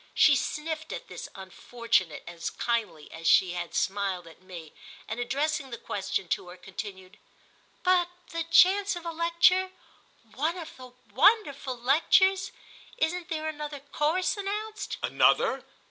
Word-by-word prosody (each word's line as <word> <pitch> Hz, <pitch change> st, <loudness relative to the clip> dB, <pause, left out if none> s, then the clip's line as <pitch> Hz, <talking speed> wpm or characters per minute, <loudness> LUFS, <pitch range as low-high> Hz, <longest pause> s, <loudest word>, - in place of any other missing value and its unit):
She 290 Hz, -, +6 dB
sniffed 315 Hz, +3 st, -3 dB
at -, -, -6 dB
this -, -, -8 dB
unfortunate 190 Hz, -2 st, -2 dB
as 170 Hz, -1 st, -5 dB
kindly 220 Hz, -10 st, -3 dB
as 165 Hz, 0 st, -5 dB
she 185 Hz, -2 st, +5 dB
had 175 Hz, -1 st, -5 dB
smiled 195 Hz, -2 st, -1 dB
at 165 Hz, +1 st, -15 dB
me 175 Hz, -4 st, -10 dB, 0.3 s
and, 220 Hz, -, -4 dB
addressing 280 Hz, +3 st, -1 dB
the 235 Hz, -, -6 dB
question 195 Hz, -3 st, -3 dB
to 180 Hz, -, -1 dB
her, 180 Hz, +1 st, -11 dB
continued: 195 Hz, +1 st, -9 dB, 0.6 s
"But 360 Hz, -1 st, +3 dB, 0.2 s
the 330 Hz, 0 st, -2 dB
chance 375 Hz, +4 st, +5 dB
of 345 Hz, -1 st, -8 dB
a 335 Hz, -, -2 dB
lecture—one 335 Hz, -4 st, 0 dB
of 330 Hz, -2 st, -8 dB
the 255 Hz, -1 st, -12 dB, 0.2 s
wonderful 290 Hz, -, +3 dB
lectures? 375 Hz, -, +3 dB, 0.5 s
Isn't 345 Hz, +2 st, -1 dB
there 315 Hz, -2 st, -3 dB
another 300 Hz, -2 st, -5 dB
course 300 Hz, +7 st, 0 dB
announced?" 420 Hz, +1 st, -4 dB
"Another? -, -, +3 dB
290 Hz, 135 wpm, -28 LUFS, -, 0.6 s, She